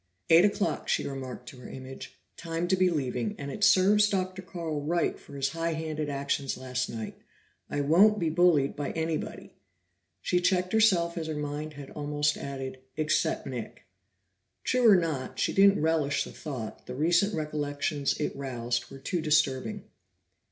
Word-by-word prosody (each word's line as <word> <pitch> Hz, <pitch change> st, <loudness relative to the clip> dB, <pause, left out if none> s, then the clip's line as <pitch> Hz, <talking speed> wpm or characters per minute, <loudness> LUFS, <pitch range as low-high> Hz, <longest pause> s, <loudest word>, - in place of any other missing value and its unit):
"Eight 165 Hz, +2 st, +8 dB
o'clock," 205 Hz, 0 st, -1 dB
she -, -, +1 dB
remarked 130 Hz, -2 st, -6 dB
to 130 Hz, -, -13 dB
her 125 Hz, -, -10 dB
image; 130 Hz, 0 st, -9 dB, 0.2 s
"Time 165 Hz, 0 st, -3 dB
to 190 Hz, -, +4 dB
be 185 Hz, -1 st, +3 dB
leaving, 125 Hz, -8 st, -2 dB
and 140 Hz, 0 st, -5 dB
it 210 Hz, -, -4 dB
serves 210 Hz, +2 st, +5 dB
Dr. 185 Hz, -1 st, -2 dB
Carl 165 Hz, -5 st, -4 dB
right 170 Hz, +4 st, 0 dB
for 140 Hz, -, -13 dB
his 140 Hz, 0 st, 0 dB
high 165 Hz, +2 st, -2 dB
handed 155 Hz, -1 st, -3 dB
actions 140 Hz, -1 st, -2 dB
last 125 Hz, 0 st, -3 dB
night. 110 Hz, -2 st, -6 dB, 0.5 s
I 145 Hz, -, -1 dB
won't 190 Hz, +9 st, +5 dB
be 165 Hz, -5 st, 0 dB
bullied 165 Hz, -5 st, +3 dB
by 145 Hz, -1 st, -3 dB
anybody." 160 Hz, -1 st, -3 dB, 0.7 s
She 180 Hz, -, +1 dB
checked 180 Hz, +1 st, +1 dB
herself 180 Hz, -6 st, +3 dB
as 160 Hz, -, -4 dB
her 155 Hz, -, -3 dB
mind 150 Hz, +1 st, -4 dB
had 140 Hz, -2 st, -10 dB
almost 145 Hz, 0 st, 0 dB
added, 135 Hz, -1 st, -6 dB, 0.2 s
"Except 155 Hz, 0 st, +1 dB
Nick." 125 Hz, -4 st, -6 dB, 0.8 s
True 250 Hz, -2 st, +4 dB
or 205 Hz, -, +8 dB
not, 160 Hz, -7 st, -1 dB
she -, -, 0 dB
didn't 195 Hz, -3 st, +5 dB
relish 155 Hz, -3 st, +1 dB
the -, -, -9 dB
thought; 130 Hz, -8 st, -7 dB
the 125 Hz, -, -5 dB
recent 170 Hz, +8 st, +2 dB
recollections 150 Hz, -1 st, -1 dB
it 150 Hz, -, -2 dB
roused 120 Hz, -3 st, -3 dB
were -, -, -10 dB
too 170 Hz, +6 st, -2 dB
disturbing. 150 Hz, +5 st, +1 dB
155 Hz, 165 wpm, -28 LUFS, 140-175 Hz, 0.8 s, Eight